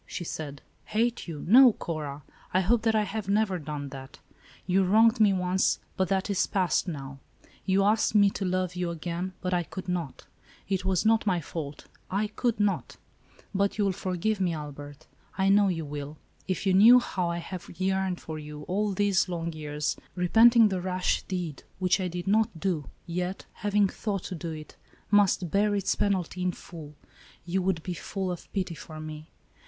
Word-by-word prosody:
she - - -5
said. 145 -4 -6 0.2
"Hate 235 0 0
you; 155 -4 -6
no, 250 +4 +8
Cora. 150 -5 -5 0.3
I 185 - +5
hope 220 +5 +2
that 225 -1 +2
I 215 - +3
have 205 -1 -4
never 200 -3 +2
done 145 -2 -5
that. 135 0 -10 0.5
You 190 +1 +3
wronged 225 +5 +4
me 210 -2 +6
once, 185 0 +1 0.2
but 190 - +1
that 190 +3 0
is 200 -3 +1
passed, 185 -1 +1
now. 135 -4 -6 0.5
You 195 +1 +3
asked 215 +1 +2
me 200 -1 +6
to 195 - -4
love 185 -1 -1
you 180 -1 -1
again, 170 +2 -4
but 185 -1 -1
I 175 - +2
could 185 +2 -8
not. 175 -6 -3 0.4
It 190 -2 -1
was 190 +1 +1
not 220 -1 +3
my 180 -3 +2
fault; 150 -2 -6 0.2
I 200 +3 0
could 230 +1 -1
not." 205 -1 0 0.4
^ - - -22
" - - -34
But 200 +1 +1
you 205 - +2
will 195 - +2
forgive 190 +2 -2
me, 180 -2 +1
Albert, 145 -1 -8 0.3
I 190 0 +3
know 200 0 +5
you 165 -4 -1
will. 145 +1 -6 0.3
If 185 +1 -2
you 190 - +3
knew 220 +6 +9
how 180 -7 -2
I 170 - -2
have 175 +1 -7
yearned 190 -1 0
for 155 -1 -6
you, 150 0 -8
all 200 +5 -1
these 190 -1 +2
long 170 -1 -3
years, 150 -1 -3 0.2
repenting 225 +5 +6
the 185 -2 -2
rash 185 0 0
deed, 175 -6 -4 0.2
which 185 +1 +2
I 185 - 0
did 175 0 -5
not 205 -3 +1
do, 160 -6 -1 0.2
yet, 180 +2 -3
having 205 0 +2
thought 195 -1 -3
to - - -5
do 170 -1 -5
it, 155 -1 -8 0.4
must 195 -5 +3
bear 205 +1 +2
its 195 -2 +1
penalty 185 -3 -1
in 180 0 0
full, 155 -4 -11 0.5
you 180 +2 0
would 180 -3 -1
be 180 - -3
full 190 +2 -4
of 175 - -8
pity 185 -3 -2
for 155 -1 -9
me. 155 0 -8
185 Hz, 195 wpm, -28 LUFS, 165-200 Hz, 0.5 s, knew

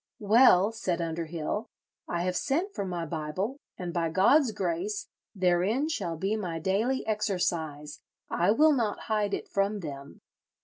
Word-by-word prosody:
'Well,' 210 -2 +5
said 190 -6 -2
Underhill, 165 +5 -3 0.4
'I 170 0 -1
have 180 0 -1
sent 335 - 0
for 200 - -3
my 175 -2 -3
Bible, 165 - -3 0.2
and, 175 -2 -5
by 170 -2 0
God's 230 - +4
grace, 195 +3 -2 0.3
therein 190 - +2
shall 170 - -2
be 195 +6 0
my 180 -6 -3
daily 205 +10 0
exercise; 165 -8 -2 0.3
I 175 +3 +1
will 300 +8 +5
not 230 -6 -1
hide 210 -2 0
it - - -7
from 200 +1 0
them.' 140 -3 -8
190 Hz, 145 wpm, -28 LUFS, 170-220 Hz, 0.4 s, Well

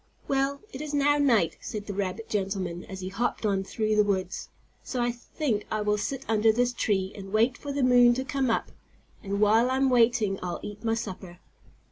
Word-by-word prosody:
"Well, 275 +1 0
it 265 - -6
is 300 -1 -4
now 290 +1 +3
night," 230 - +3
said 210 -1 -5
the 205 - -5
rabbit 200 +3 -3
gentleman 190 -4 -2
as 190 -1 -8
he 185 - -4
hopped 225 +3 -2
on 195 -2 +1
through 215 +2 -1
the 210 - +5
woods, 190 -3 -2 0.3
"so 255 - -4
I 240 0 +1
think 240 -1 -3
I 215 - -1
will 210 0 +1
sit 270 +5 -3
under 220 0 +4
this 245 +2 +1
tree 195 -5 0
and 195 -1 -9
wait 230 +4 +3
for 285 - -6
the 280 -1 -1
moon 245 -1 +6
to 260 +1 -3
come 270 -1 0
up. 225 - 0 0.5
And 200 -1 -3
while 220 +4 +4
I'm 265 0 +2
waiting 230 -5 +3
I'll 180 -1 -4
eat 205 +1 -8
my 225 0 +1
supper." 190 -5 -6
220 Hz, 205 wpm, -27 LUFS, 200-250 Hz, 0.5 s, moon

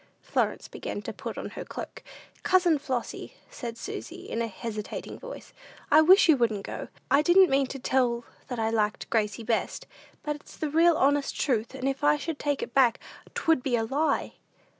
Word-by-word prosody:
Florence - - -1
began - - -5
to - - -5
put - - -6
on - - -5
her - - -6
cloak. - - -8 0.4
"Cousin 355 -5 +3
Flossy," 255 -3 -4 0.2
said 235 -2 -6
Susy, - - -7
in 230 - -2
a 230 - 0
hesitating 215 0 -6
voice, - - -10 0.4
"I 305 +2 +8
wish 370 +5 +7
you 320 - +7
wouldn't 220 -6 0
go. - - -6 0.2
I 285 - +6
didn't 360 +2 +6
mean 270 0 +3
to 275 - -6
tell 245 -2 +1 0.2
that 245 - -4
I 225 0 0
liked 215 -2 -1
Gracie 215 -1 0
best; 225 0 -1 0.4
but 295 -1 -2
it's 295 - -14
the 305 -2 -2
real 330 +1 +5
honest 285 +1 +1
truth, 235 -2 0
and 265 0 -2
if 275 +1 -2
I 295 0 +5
should 315 0 -4
take 290 -2 -1
it - - -7
back, 250 -4 +4 0.4
'twould 325 -5 +2
be 250 -1 0
a 225 - +1
lie." 280 +5 0
270 Hz, 190 wpm, -27 LUFS, 230-300 Hz, 0.4 s, I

